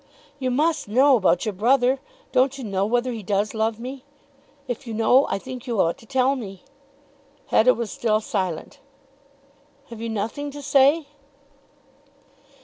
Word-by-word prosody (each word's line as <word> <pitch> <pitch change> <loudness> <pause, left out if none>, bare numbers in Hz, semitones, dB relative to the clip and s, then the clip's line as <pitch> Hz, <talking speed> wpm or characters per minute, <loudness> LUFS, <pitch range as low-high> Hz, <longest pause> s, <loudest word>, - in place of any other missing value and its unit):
"You 260 -1 -1
must 310 +4 0
know 260 +6 +5
about 190 -3 +2
your 215 - -2
brother. 250 +6 +2 0.3
Don't 265 +2 +2
you 265 - -7
know 195 -2 -1
whether 245 +2 0
he 230 -2 -5
does 205 +2 -1
love 220 0 -1
me? 260 +2 -7 0.6
If 245 0 -5
you 225 - -4
know 245 +5 +4
I - - 0
think 255 +4 -9
you 235 -4 -1
ought 165 -1 +1
to 225 - -17
tell 265 +2 +2
me." 195 -7 -8 0.9
Hetta 255 +3 +5
was 235 -2 -4
still 215 -2 +1
silent. 185 -6 -4 1.1
"Have 230 -1 -9
you 230 - -3
nothing 225 +7 -3
to 290 +1 -9
say?" 285 +3 +4
240 Hz, 155 wpm, -23 LUFS, 215-265 Hz, 1.1 s, know